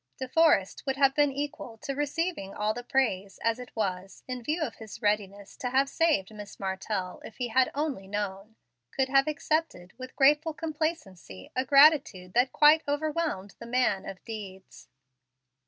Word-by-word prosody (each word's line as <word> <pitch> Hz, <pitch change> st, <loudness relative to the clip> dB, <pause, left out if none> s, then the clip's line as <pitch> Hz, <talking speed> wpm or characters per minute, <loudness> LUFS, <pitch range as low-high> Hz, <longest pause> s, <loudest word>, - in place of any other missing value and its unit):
De 260 Hz, -, -4 dB
Forrest 280 Hz, -, +3 dB
would 265 Hz, -, 0 dB
have 275 Hz, -1 st, +4 dB
been 290 Hz, 0 st, +3 dB
equal 275 Hz, -4 st, -5 dB
to 275 Hz, +3 st, -5 dB
receiving 290 Hz, -, -2 dB
all 210 Hz, +1 st, 0 dB
the 245 Hz, +2 st, -7 dB
praise, 220 Hz, -8 st, 0 dB
and 230 Hz, -, +1 dB
as 230 Hz, -, -9 dB
it 250 Hz, -, -10 dB
was, 195 Hz, -3 st, -3 dB
in 255 Hz, -1 st, -4 dB
view 310 Hz, +5 st, -1 dB
of 255 Hz, -, -5 dB
his 220 Hz, -1 st, -10 dB
readiness 205 Hz, -2 st, -2 dB
to 250 Hz, -, -4 dB
have 265 Hz, +2 st, +3 dB
saved 280 Hz, -, +1 dB
Miss 205 Hz, -1 st, -10 dB
Martell 190 Hz, -1 st, -3 dB
if 220 Hz, -, -11 dB
he 245 Hz, -2 st, -2 dB
"had 255 Hz, +3 st, +3 dB
only 280 Hz, -10 st, -2 dB
known," 205 Hz, +1 st, -4 dB, 0.3 s
could 265 Hz, -1 st, -1 dB
have 275 Hz, +1 st, +4 dB
accepted, 305 Hz, -, -2 dB
with 255 Hz, 0 st, -9 dB
graceful 300 Hz, +3 st, +3 dB
complacency, 300 Hz, -, -4 dB
a 255 Hz, -, +1 dB
gratitude 275 Hz, -, +5 dB
that 250 Hz, +2 st, +3 dB
quite 305 Hz, +1 st, +6 dB
overwhelmed 290 Hz, -, -2 dB
the 235 Hz, -, -9 dB
man 245 Hz, -5 st, +1 dB
of 190 Hz, -, -10 dB
deeds. 200 Hz, -4 st, -9 dB
250 Hz, 170 wpm, -28 LUFS, 200-290 Hz, 0.3 s, quite